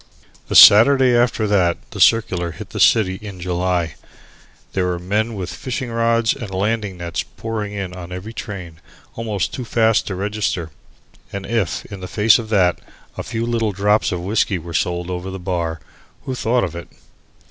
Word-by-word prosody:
The - - -3
Saturday 125 +4 +8
after 120 -2 +2
that 95 -5 +2 0.2
circular 90 -7 +2
hit - - -10
the - - -5
city 95 -4 +4
in 100 -3 -9
July, 90 -2 -1 0.8
there 95 -1 0
were 90 -1 -1
men 105 +6 -1
with 90 -3 -5
fishing 130 -2 -4
rods 115 0 +2
and 120 -7 -7
landing 100 0 -2
nets 85 -1 -3
pouring 110 -2 -5
in 100 -3 -5
on 90 -1 -9
every 90 +5 -7
train, 90 -7 -8 0.3
almost 110 -5 -3
too 130 - -4
fast 115 -1 +2
to 95 - -3
register. 100 -4 -2 0.6
And 100 -1 -5
if, 115 -8 -1
in 100 - -9
the 90 - -7
face 110 +5 +4
of 110 -2 -7
that, 95 -5 +2 0.3
a - - -4
few 115 -1 -3
little 115 -3 -1
drops 105 +3 +2
of 90 -1 -3
whiskey 100 +1 0
were 85 0 -8
sold 85 +2 -1
over 90 +1 -4
the 95 - -6
bar, 85 -3 -3 0.5
who 130 - -3
thought 125 0 +1
of 85 -3 -3
it? 85 - -7
100 Hz, 175 wpm, -20 LUFS, 90-115 Hz, 0.8 s, Saturday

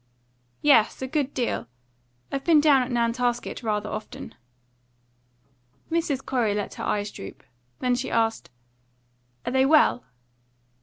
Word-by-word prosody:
"Yes, 275 -7 +5
a - - -2
good 285 0 -1
deal. 245 -4 -2 0.6
I've 275 0 -2
been 325 -3 +5
down 290 -3 +5
at 250 - -3
Nantasket 240 0 -1
rather 210 -2 -1
often." 215 - -7 1.6
Mrs. 320 -5 -1
Corey 235 -6 0
let 205 - -3
her - - -7
eyes 205 0 -1
droop. 95 - -10 0.4
Then 250 -1 +2
she 245 - -2
asked: 225 -1 0 1.0
"Are - - -1
they 265 0 +3
well?" 290 -3 +4
250 Hz, 125 wpm, -25 LUFS, 225-275 Hz, 1.6 s, Yes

